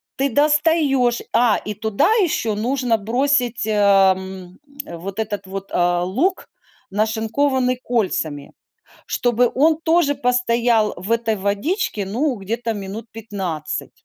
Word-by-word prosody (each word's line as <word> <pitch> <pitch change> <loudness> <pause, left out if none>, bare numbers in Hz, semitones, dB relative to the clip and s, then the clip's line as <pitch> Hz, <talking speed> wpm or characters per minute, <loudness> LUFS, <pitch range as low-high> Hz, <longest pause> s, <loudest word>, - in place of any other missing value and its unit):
ты 275 -1 0
достаешь, 295 -4 +2
а 235 -3 +3
и 210 - -5
туда 220 - +1 0.2
еще 230 -10 -1
нужно 245 +1 0
бросить, 245 +1 0
э, 215 - 0 0.4
м, 190 -1 -9 0.3
вот 185 +4 -7
этот 205 -2 -3
вот, 195 +1 -7
а, 175 0 +1
лук, 270 - -1 0.4
нашинкованный 225 +5 0
кольцами, 165 -11 -2 0.5
чтобы 245 0 +1
он 310 +3 +3
тоже 325 -3 +2
постоял 240 -4 +2
в 185 +6 -3
этой 230 -1 0
водичке, 205 - -1
ну, 255 +8 0
где-то 225 +3 -3
минут 205 +2 -7
15. 195 -8 -5
225 Hz, 120 wpm, -20 LUFS, 200-255 Hz, 0.5 s, а